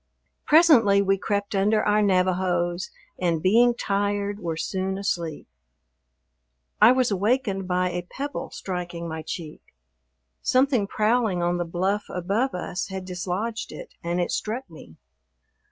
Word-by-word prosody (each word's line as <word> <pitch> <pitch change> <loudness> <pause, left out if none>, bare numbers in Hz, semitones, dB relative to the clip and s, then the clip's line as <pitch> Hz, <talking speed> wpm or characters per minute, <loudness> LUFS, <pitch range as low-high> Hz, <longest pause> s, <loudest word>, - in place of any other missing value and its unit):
Presently 260 -12 +6
we 195 0 +1
crept 205 0 -2
under 205 +2 +2
our 210 0 +3
Navajos 185 -2 +1 0.3
and, 170 -3 +1
being 235 +7 +4
tired, 205 -1 -1
were 165 -4 -3
soon 190 +2 -2
asleep. 170 -6 -3 1.3
I 220 +3 +9
was 255 -3 +2
awakened 200 -1 0
by 180 0 +1
a 175 0 -2
pebble 285 +2 -5
striking 175 -2 -5
my 160 -1 -5
cheek. 155 0 -7 0.8
Something 255 -5 +2
prowling 215 -4 +1
on 175 0 +1
the 175 - -2
bluff 190 +5 -1
above 200 +7 -1
us 180 +1 -4
had 190 -1 -6
dislodged 190 +5 -3
it - - -10
and 170 +1 -1
it 175 - -1
struck 235 +5 -3
me. 155 - -13
195 Hz, 135 wpm, -25 LUFS, 180-215 Hz, 1.3 s, I